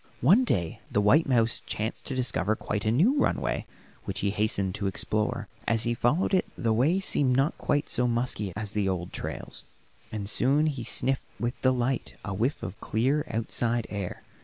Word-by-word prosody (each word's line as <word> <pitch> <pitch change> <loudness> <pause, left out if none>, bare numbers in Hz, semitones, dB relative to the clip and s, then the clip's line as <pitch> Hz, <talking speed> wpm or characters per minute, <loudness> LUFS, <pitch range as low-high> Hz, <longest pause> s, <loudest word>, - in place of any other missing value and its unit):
One 190 - +6
day 85 - 0
the - - +1
white 135 +10 +4
mouse 115 -3 +3
chanced 110 +2 -4
to 135 - -2
discover 110 -5 0
quite 105 -1 -3
a 110 - +3
new 210 - +3
runway - - 0 0.4
which 95 +1 -3
he 100 - +1
hastened 100 -2 0
to 100 0 -2
explore. 105 +2 0 0.2
As 115 0 +2
he 120 - +1
followed 140 +12 +1
it 185 - +3
the 115 -2 +1
way 145 +12 +3
seemed 140 -9 +2
not 135 +4 +2
quite 145 0 0
so 125 - +1
musky 120 -4 -1
as 105 0 -4
the 105 -2 0
old 90 -2 -3
trails, - - -4 0.5
and 105 -2 -4
soon 140 +7 +3
he 140 -6 -2
sniffed 135 +3 +1 0.2
with 120 +2 -3
delight 130 0 0
a 105 - -3
whiff 115 +8 -1
of 105 - -6
clear, 135 +7 0
outside 115 +1 0
air. 100 -3 -5
115 Hz, 185 wpm, -27 LUFS, 105-135 Hz, 0.5 s, One